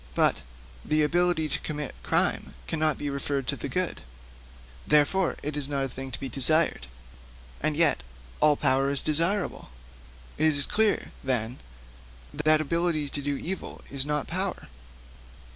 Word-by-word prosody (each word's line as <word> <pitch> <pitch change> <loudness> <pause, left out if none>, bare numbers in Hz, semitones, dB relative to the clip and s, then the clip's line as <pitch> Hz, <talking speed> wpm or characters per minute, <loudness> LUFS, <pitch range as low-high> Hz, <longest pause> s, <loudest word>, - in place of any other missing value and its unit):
But - - +2 0.4
the 155 0 +2
ability 175 0 +2
to 155 +1 -2
commit 150 -2 -5
crime - - +1
cannot 155 -2 0
be 145 - -3
referred 140 -1 -1
to - - 0
the - - -5
good; 185 -1 -1 0.9
therefore 150 +5 +3
it 150 0 -3
is 145 -1 -1
not 140 -1 -1
a - - -1
thing 135 +1 -7
to 125 - -6
be 135 - -4
desired. 140 - +2 0.7
And 155 -1 0
yet 160 - +3 0.4
all 150 -1 +5
power 135 -1 +2
is 140 -1 +5
desirable; 170 - +1 0.7
it 155 -1 +3
is 140 - 0
clear, 215 0 +1
then, 125 -2 -1 0.7
that 155 +1 +3
ability 160 -1 0
to 145 - -4
do 145 0 -2
evil 185 +5 -5
is 135 -1 0
not 150 0 -1
power. 185 - -4
150 Hz, 150 wpm, -27 LUFS, 140-165 Hz, 0.9 s, all